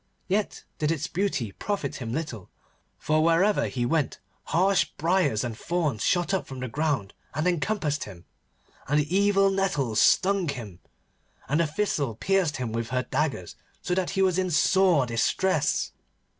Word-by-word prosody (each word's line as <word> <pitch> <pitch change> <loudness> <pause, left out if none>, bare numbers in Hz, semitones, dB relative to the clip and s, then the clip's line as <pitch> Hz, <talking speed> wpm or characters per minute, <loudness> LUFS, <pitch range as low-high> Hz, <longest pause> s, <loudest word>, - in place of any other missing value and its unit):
Yet 200 +2 -1 0.2
did 150 0 +1
its 160 -4 -1
beauty 180 - -1
profit 195 - -3
him 115 -3 -5
little, 125 - -5 0.5
for 155 0 +1
wherever 170 +5 +3
he 120 -2 -2
went 150 +2 0 0.3
harsh 190 +2 +3
briars 165 - +1
and 120 -2 -4
thorns 150 -4 -1
shot 175 +2 +1
up 190 - -1
from 135 -1 -8
the 130 - -3
ground 140 -6 -1 0.2
and 155 +3 -1
encompassed 175 -4 0
him, 90 -4 -12 0.6
and 150 +2 +2
evil 195 +5 +3
nettles 150 - 0
stung 195 -2 +3
him, 110 -10 -6 0.7
and 150 +3 +1
the 170 - +2
thistle 150 - -1
pierced 185 - +1
him 125 -3 -3
with 115 0 -3
her 125 +1 0
daggers, 135 - -2 0.3
so 180 - -1
that 185 -1 0
he 195 - +4
was 185 -1 +2
in 185 -1 0
sore 175 -2 +4
distress. 145 +7 +1
155 Hz, 155 wpm, -26 LUFS, 125-190 Hz, 0.7 s, he